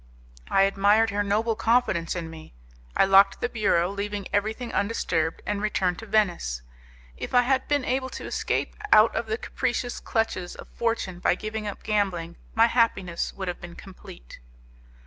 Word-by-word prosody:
I 195 - +4
admired 200 +3 +3
her 205 +1 0
noble 215 +3 0
confidence 225 -9 +1
in 170 -2 -4
me. 160 - -12 0.4
I - - +6
locked 195 +1 +5
the - - 0
bureau, 195 -6 +1
leaving 200 0 -4
everything 220 +4 -1
undisturbed, 170 -6 -1
and 205 -1 -2
returned 185 -4 0
to 225 - -9
Venice. 175 - 0 0.5
If - - -5
I 245 - +6
had 260 +1 +1
been 290 -3 +1
able 260 +1 -1
to - - -8
escape - - -2 0.2
out 215 +2 +6
of 230 - -2
the 220 +1 -1
capricious 245 -1 -2
clutches 205 -6 -2
of - - -11
fortune 225 -6 -2
by 180 - +2
giving 215 +1 -5
up 205 - -7
gambling, 185 -6 -1 0.2
my 225 +1 +6
happiness 230 -7 0
would 190 -1 -6
have 180 - -4
been 175 0 -9
complete. 120 - -12
205 Hz, 165 wpm, -26 LUFS, 180-225 Hz, 0.5 s, I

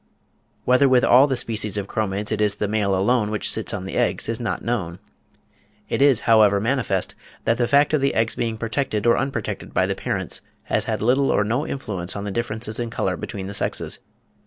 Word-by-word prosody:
Whether 130 +2 +4
with 125 -1 +4
all 130 +4 +6
the 135 - 0
species 110 -4 -1
of 100 - -2
Chromids 105 0 -2
it 110 -1 -1
is 105 -1 +2
the 105 - -2
male 100 -2 +1
alone 105 +3 +2
which 105 0 -1
sits 110 - -2
on 95 -3 -4
the 95 - -4
eggs - - +1
is - - -2
not - - -3
known. 95 -8 -2 0.9
It - - -1
is, 140 -5 +5
however, 105 -3 +5
manifest 115 -4 -1 0.3
that 115 +1 +1
the 120 - +2
fact 145 +3 +3
of 150 - +2
the 140 - +1
eggs 115 0 +1
being 115 -2 -2
protected 115 -1 -2
or 120 - +5
unprotected 135 +1 -3
by - - +3
the - - -1
parents, - - -4 0.2
has 110 - -1
had 110 -3 -2
little 135 +4 +3
or - - +3
no 120 +9 -1
influence 95 -9 -4
on 100 - -4
the 100 - -4
differences 110 0 -3
in 120 -1 -2
colour 95 -5 -1
between 95 +2 -6
the 100 - -6
sexes. - - -2
110 Hz, 210 wpm, -22 LUFS, 100-125 Hz, 0.9 s, all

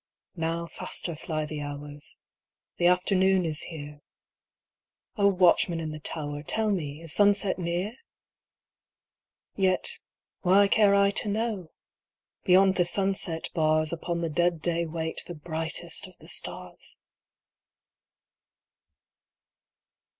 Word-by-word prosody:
Now 165 0 -2
faster 170 +1 -6
fly 155 0 -3
the 150 -1 -5
hours 145 0 -8 0.3
— - - -60
The 175 - +4
afternoon 185 +1 +3
is 155 -2 -1
here; 150 -3 -8 1.1
O 200 -3 +4
watchman 180 -3 +4
in 160 -1 -4
the 155 - -7
tower, 145 -1 -4
Tell 215 +7 0
me, 155 -4 -3
is 165 - -6
sunset 205 -2 +3
near? 175 +5 -2 1.6
Yet 190 -2 +2 0.2
— - - -65
why 195 +2 +5
care 205 -2 +5
I 200 0 +4
to 205 - 0
know? 210 -5 -2 0.4
— - - -64
Beyond 190 +1 +5
the 175 - +3
sunset 190 -3 -2
bars 155 -1 +2
Upon 170 +1 -3
the 165 - -1
dead 175 +1 +1
day 170 0 0
wait 160 0 -3
The 175 - -6
brightest 160 +1 -3
of - - -17
the - - -15
stars - - -5
170 Hz, 125 wpm, -27 LUFS, 155-190 Hz, 1.6 s, why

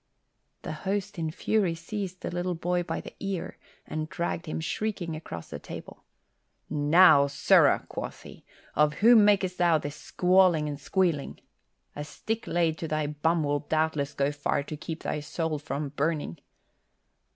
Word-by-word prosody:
The - - -4
host 195 +4 -3
in 160 -1 -1
fury 185 +1 0
seized 185 +1 -5
the - - -4
little 175 0 -2
boy 175 +2 0
by 175 - -3
the - - -10
ear 195 -3 -4 0.3
and 155 0 -4
dragged 170 0 -3
him 155 - -3
shrieking 175 -1 -3
across 85 - -8
the - - -5
table. - - -10 0.7
"Now, 150 0 +6
sirrah," 145 +1 +4
quoth - - -6
he, - - -13 0.3
"of 150 0 +3
whom 235 -2 +8
mak'st 195 -3 +2
thou 170 -2 +4
this 145 -1 -5
squalling 180 -1 +3
and 145 -1 -4
squealing? 165 -2 0 0.6
A 145 - -4
stick 220 +9 -4
laid 165 -2 +1
to 165 - -3
thy 155 -1 -1
bum 155 +3 0
will 145 0 +1
doubtless 155 -1 -1
go 140 +1 +1
far 145 -1 -1
to 155 - -6
keep 160 +2 -7
thy 150 - -2
soul 155 +1 -3
from 145 -1 -4
burning." 145 - -2
160 Hz, 160 wpm, -28 LUFS, 150-180 Hz, 0.7 s, whom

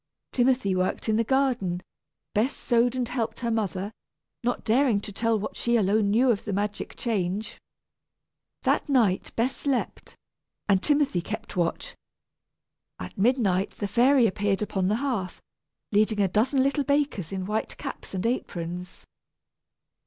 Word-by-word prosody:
Timothy 245 -6 +2
worked 185 +4 -1
in 215 - +3
the 230 - +3
garden, 245 -8 +1 0.5
Bess 230 +7 +1
sewed 240 0 +2
and 250 -2 -1
helped 230 -2 -3
her 235 -1 -1
mother, 205 -2 -1 0.5
not 245 +1 -1
daring 235 -1 +3
to 205 - -7
tell 225 +2 +1
what 210 - -5
she 235 0 +1
alone 210 -1 +3
knew 245 +5 +4
of 205 - -1
the 210 - -3
magic 205 +1 -3
change. 205 -2 -2 1.0
That - - +1
night 225 -9 +2
Bess 240 +3 +1
slept, 275 -3 -3 0.5
and 195 -3 +3
Timothy 285 - +2
kept 215 +4 -6
watch. 170 -2 -1 1.0
At 90 - -8
midnight 200 -4 +1
the 205 - -2
fairy 250 +4 +4
appeared 205 0 0
upon 190 -3 -1
the 210 - +2
hearth, 200 -10 -2 0.5
leading 215 0 +2
a 200 - +4
dozen 250 +8 +2
little 280 +1 +1
bakers 280 - 0
in 190 -1 -3
white 215 +2 -2
caps - - -7
and 185 - -2
aprons. 180 -6 -4
220 Hz, 145 wpm, -26 LUFS, 195-245 Hz, 1.0 s, knew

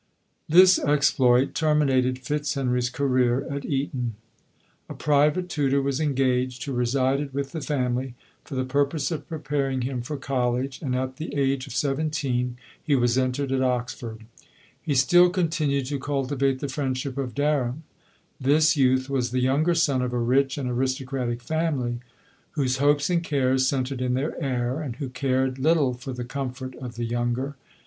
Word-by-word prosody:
This 185 +3 +7
exploit 135 -3 +3
terminated 135 -5 +2
Fitzhenry's 130 -2 -1
career 130 -1 +1
at 140 0 -4
Eton. 130 -5 -2 0.7
A - - -6
private 150 +4 +2
tutor 140 -5 +1
was 140 0 -1
engaged, 130 -4 0
who 140 - -4
re 120 -1 0
sided 135 +2 0
with 140 -1 -2
the 160 - -5
family, 130 -3 -1 0.3
for 145 - -8
the 130 0 -1
purpose 140 +4 0
of 150 -3 -4
pre 160 - -4
paring 135 -3 -1
him 125 -1 -2
for 145 +5 -5
college, 130 0 -1
and 130 -5 -1
at 130 0 -3
the 155 -2 -5
age 135 -1 0
of 130 - -8
seventeen 135 -3 -1 0.3
he 145 - +2
was 120 -2 +2
entered 130 +1 0
at 135 -1 +1
Oxford. 120 -3 -2 0.6
He 150 -4 -1
still 175 +7 +6
continued 155 -6 0
to 140 +1 -3
cultivate 135 -1 -1
the 145 - -2
friendship 130 -1 -3
of 130 -4 -4
Der 145 -2 +1
ham. 130 +7 -5 0.6
This 150 +4 +4
youth 130 -2 +3
was 130 -3 0
the 130 +1 -1
younger 145 +7 +2
son 140 -6 +2
of 125 -1 -2
a - - 0
rich 135 +3 +2
and 135 -3 -2
aristocratic 130 -1 -2
family, 140 -6 -1 0.5
whose 135 -4 0
hopes 145 +3 +2
and 170 -1 +1
cares 130 -4 +1
centred 130 -1 -1
in 125 0 0
their 140 +4 -2
heir, 130 +1 -1
and 135 -6 -5
who 135 0 -5
cared 130 +1 0
little 150 -2 +3
for 125 +2 -7
the 125 -1 -5
comfort 130 0 -5
of 125 -2 -7
the 120 0 -3
younger. 120 +4 -2
135 Hz, 170 wpm, -25 LUFS, 125-145 Hz, 0.7 s, This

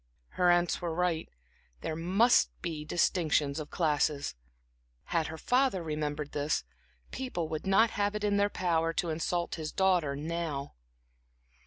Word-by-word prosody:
Her 180 -1 +2
aunts 175 +1 +2
were 170 -2 -2
right; 175 -2 0 0.5
there 155 - -3
must 190 +9 +4
be 160 -4 -3
distinctions 155 -3 +1
of 150 - -6
classes. 150 -3 0 0.7
Had 165 - 0
her 160 - -6
father 250 -4 +1
remembered 150 -1 -3
this, 145 +1 0 0.5
people 250 -11 -3
would 155 +4 -4
not 215 +4 +4
have 205 0 0
it 210 - -3
in 205 -1 +2
their 200 0 +3
power 165 -4 0
to 170 -1 -1
insult 170 +2 -1
his 155 - -4
daughter 180 -7 +2
now. 155 -2 -3
165 Hz, 145 wpm, -30 LUFS, 155-185 Hz, 0.7 s, must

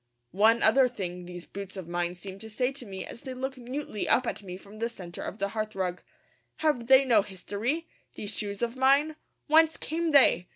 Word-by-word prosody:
One 220 +4 +4
other 255 +4 +6
thing 180 -7 -5
these 175 0 -8
boots 195 -1 -8
of 185 -3 -6
mine 175 0 -2
seem 190 +1 -9
to 220 +2 -8
say 250 +4 0
to 265 -4 -7
me 190 -1 -6
as - - -9
they 260 -1 -6
look 265 +1 -3
mutely 250 -3 -4
up 255 - +4
at - - -3
me 185 -2 -7
from 200 +3 -14
the 230 +1 0
centre 180 -7 -8
of 200 - -5
the 200 -2 -1
hearthrug. 195 -4 -3 0.5
Have 295 -7 0
they 265 +1 +7
no 230 -5 +5
history, 210 - -3 0.3
these 205 +1 -4
shoes 205 +1 -3
of 235 +1 -1
mine? 280 +4 +3 0.3
Whence 320 +1 +5
came 330 +1 -2
they? 270 - +5
220 Hz, 205 wpm, -28 LUFS, 195-265 Hz, 0.5 s, they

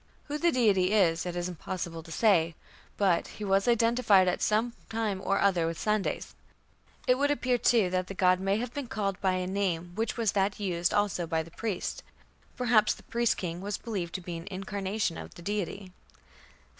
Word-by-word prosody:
Who 295 +1 -4
the 340 +1 +3
deity 205 - +3
is 175 -5 +3
it 175 - -4
is 175 0 -2
impossible 175 -1 -5
to 165 0 -13
say, 170 -4 +3 0.4
but 190 -4 +2
"he 215 - -6
was 195 +1 +2
identified 230 -5 +4
at 180 - 0
some 225 +3 +1 0.2
time 215 -4 -2
or 195 - +1
other 180 -4 +3
with 165 0 -3
Sandes". 210 -2 -1 0.7
It 255 0 +3
would 285 0 +2
appear, 255 -4 +1
too, 220 -6 +3
that 185 0 0
the 195 - -7
god 185 -1 +3
may 195 +1 +1
have 240 +1 -4
been 285 -3 -4
"called 200 -4 -2
by 190 -1 +2
a 185 0 -1
name 180 -3 -1
which 225 +6 -2
was 225 -4 +2
that 195 0 0
used 175 -4 0
also 200 -4 0
by 160 0 0
the 165 - -14
priest". 210 -1 -3 0.6
Perhaps 230 -4 +3
the - - -16
priest 235 -1 0
king 175 -1 -4
was 200 0 -3
believed 190 -7 -4
to 185 - -3
be 175 -1 -5
an 165 - -9
incarnation 195 -1 -2
of - - -10
the 170 - -11
deity. 200 -1 -3
195 Hz, 195 wpm, -29 LUFS, 180-220 Hz, 0.7 s, identified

